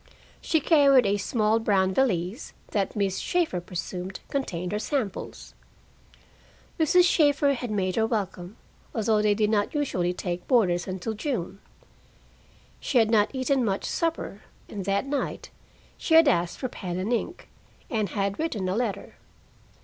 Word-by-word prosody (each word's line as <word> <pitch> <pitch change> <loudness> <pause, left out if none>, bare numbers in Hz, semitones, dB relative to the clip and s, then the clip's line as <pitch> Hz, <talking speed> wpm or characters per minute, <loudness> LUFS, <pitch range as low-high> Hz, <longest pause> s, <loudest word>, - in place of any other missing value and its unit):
She 320 - +1
carried 280 -5 +5
a 200 +1 +2
small 215 +2 +1
brown 190 -4 +2
valise 195 - -1 0.2
that 200 -2 -1
Miss 200 -2 0
Shaeffer 335 - 0
presumed 180 +1 -6
contained 180 -10 -3
her 210 - -1
samples. 230 -6 -4 1.3
Mrs. 345 +3 +5
Shaeffer 290 -4 +3
had 245 -2 -4
made 190 -2 -1
her 225 0 +2
welcome, 200 -3 -4 0.4
although 220 -1 +2
they 210 -1 +3
did 210 0 +1
not 205 +6 0
usually 185 -12 0
take 180 -1 -5
boarders 185 -9 +2
until 190 +4 -4
June. 210 - -4 1.2
She 265 - -1
had 225 -2 +4
not 210 -2 +4
eaten 265 0 0
much 195 -3 -1
supper, 330 - -2 0.3
and 200 -3 -6
that 200 +3 0
night 280 0 -3 0.5
she 320 - +2
had 325 -1 +7
asked 175 -4 +1
for 260 - -3
pen 180 -7 -5
and 195 +6 -1
ink, 295 +9 -3 0.4
and 215 - -1
had 200 +1 -2
written 225 - -2
a 185 - -1
letter. 215 -4 -3
215 Hz, 150 wpm, -26 LUFS, 190-265 Hz, 1.3 s, had